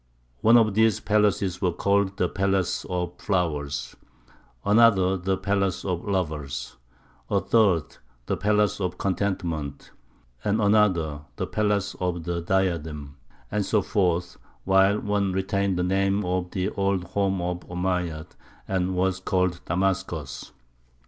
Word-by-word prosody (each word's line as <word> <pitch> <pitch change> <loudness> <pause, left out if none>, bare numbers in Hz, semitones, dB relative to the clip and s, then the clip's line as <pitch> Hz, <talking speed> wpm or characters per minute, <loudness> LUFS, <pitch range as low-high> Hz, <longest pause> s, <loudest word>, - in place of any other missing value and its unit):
One 115 +2 +6
of 110 -3 +3
these 110 -1 +3
palaces 100 -3 +1
was 90 -3 +1
called 100 -1 +1
the 90 - +2
Palace 95 0 0
of 90 -1 -3
Flowers, 75 -8 -2 0.7
another 100 -3 +5
the 95 +1 -1
Palace 100 -2 -1
of 90 -3 -2
Lovers, 75 -9 -3 0.5
a - - +2
third 100 -9 +2 0.3
the - - -1
Palace 105 0 +1
of 90 -1 -2
Contentment, 85 -7 -2 0.5
and 105 +2 +1
another 95 -8 +2
the - - -2
Palace 105 -2 0
of 90 -2 -2
the 85 +1 -2
Diadem, 80 -6 -1 0.3
and 105 0 0
so 105 0 +1
forth, 90 -4 0 0.3
while 95 +2 +4
one 100 -2 0
retained 95 0 0
the 90 - +1
name 95 +2 +1
of 90 0 -1
the 95 +1 -1
old 100 -2 0
home 95 +1 -1
of 90 0 -2
the - - -19
Omeyyads 90 -3 -3 0.3
and 95 -1 -1
was 95 0 +1
called 90 -2 0
"Damascus." 85 -7 -2
95 Hz, 135 wpm, -25 LUFS, 85-100 Hz, 0.7 s, One